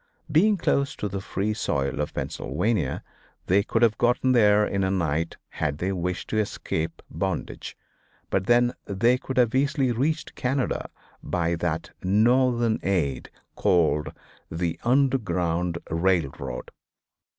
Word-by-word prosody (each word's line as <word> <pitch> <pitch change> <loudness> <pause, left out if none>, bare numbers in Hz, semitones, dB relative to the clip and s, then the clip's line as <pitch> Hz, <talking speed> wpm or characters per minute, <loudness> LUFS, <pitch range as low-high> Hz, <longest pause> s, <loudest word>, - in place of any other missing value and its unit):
Being 200 +7 +4
close 140 -4 +1
to 105 - -3
the 100 -1 -4
free 100 +2 -2
soil 70 -8 -1
of 75 - -4
Pennsylvania 75 - -1 0.4
they 95 +3 +4
could 115 +2 0
have 110 -3 +3
gotten 125 +2 +3
there 105 -3 +5
in 100 -1 -1
a 95 - +1
night 85 -3 -1
had 70 0 -2
they 90 +5 -1
wished 90 -1 -3
to 110 - 0
escape 80 -5 -3
bondage, - - -4 0.5
and 95 0 0
then 120 0 +4
they 115 +6 +2
could 130 0 -6
have 120 -3 +4
easily 140 -1 +2
reached 150 +7 -1
Canada 130 +1 -1 0.3
by 85 -1 -1
that 85 -1 -2
Northern 120 +3 +3
aid, 75 -9 -1 0.2
called 80 -4 +2 0.4
the 85 0 -2
"Underground 90 -10 +1
Railroad." 85 -3 -1
100 Hz, 130 wpm, -25 LUFS, 85-120 Hz, 0.5 s, there